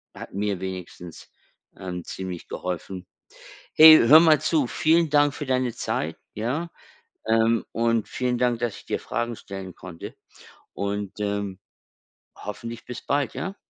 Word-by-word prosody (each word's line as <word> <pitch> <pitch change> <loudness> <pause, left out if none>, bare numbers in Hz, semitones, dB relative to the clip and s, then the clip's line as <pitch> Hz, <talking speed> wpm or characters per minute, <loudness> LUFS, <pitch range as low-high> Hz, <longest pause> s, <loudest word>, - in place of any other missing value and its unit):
hat - - -10
mir 100 -1 -2
wenigstens, 90 -2 -8 0.5
ähm, 90 -2 -6
ziemlich 90 -2 -6
geholfen. 90 +1 -5 0.7
Hey, 155 0 +11
hör 145 +7 +8
mal 160 -2 +5
zu. 155 -5 +2
Vielen 160 +6 +2
Dank 145 0 +4
für 145 - -6
deine 130 -2 0
Zeit, 80 +1 -3 0.2
ja? 135 +11 -3 0.6
Ähm, 115 0 +3
und 115 -1 0
vielen 125 -1 -1
Dank, 120 -1 +1
dass 120 -3 -2
ich - - -16
dir - - -2
Fragen 120 0 -3
stellen 95 -3 -8
konnte 90 -3 -10 0.6
und, 100 -1 -3
ähm, 100 -2 -3 0.8
hoffentlich 115 +3 -7
bis 125 0 -7
bald, 140 -2 0
ja? 195 +2 -5
115 Hz, 140 wpm, -24 LUFS, 95-130 Hz, 0.8 s, Hey